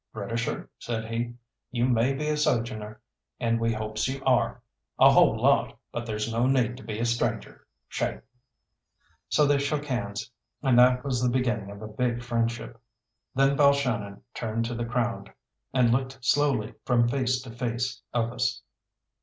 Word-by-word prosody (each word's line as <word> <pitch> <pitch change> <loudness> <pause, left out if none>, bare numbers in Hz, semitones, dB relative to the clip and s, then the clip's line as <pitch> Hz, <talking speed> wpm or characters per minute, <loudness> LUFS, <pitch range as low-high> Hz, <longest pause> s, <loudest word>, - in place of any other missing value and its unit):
"Britisher," 115 +2 -3
said 110 -2 -3
he, 115 +1 -3 0.3
"you 120 -1 0
may 125 +1 +3
be 150 +2 -3
a 150 - +1
sojourner, 110 -6 -1 0.4
and 115 0 +1
we 115 0 +1
hopes 110 0 -2
you 135 +1 -3
are, 125 -3 +2 0.4
a - - +8
whole - - +5
lot, - - +3
but 120 0 -4
there's 110 +1 -2
no 120 +2 +2
need 125 -3 +2
to - - -11
be 110 - -5
a 115 - 0
stranger. 120 0 -2 0.2
Shake." - - -2 1.1
So 150 - +4
they 145 0 +3
shook 145 +1 -1
hands, 105 -5 -3 0.3
and 130 -3 +5
that 125 0 +5
was 130 -3 0
the 125 - +3
beginning 120 -5 0
of 100 +1 -9
a - - -5
big 120 +2 -1
friendship. 115 0 -2 0.5
Then 135 +1 +4
Balshannon 125 -9 +2
turned 115 0 -2
to 120 - -3
the 120 0 -3
crowd, 115 -4 -2 0.4
and 125 -3 +3
looked 130 +2 0
slowly 130 -5 +2
from 120 -2 +3
face 130 0 +1
to 125 - -9
face 120 +1 -3
of 115 0 0
us. - - -1
120 Hz, 165 wpm, -27 LUFS, 115-130 Hz, 1.1 s, a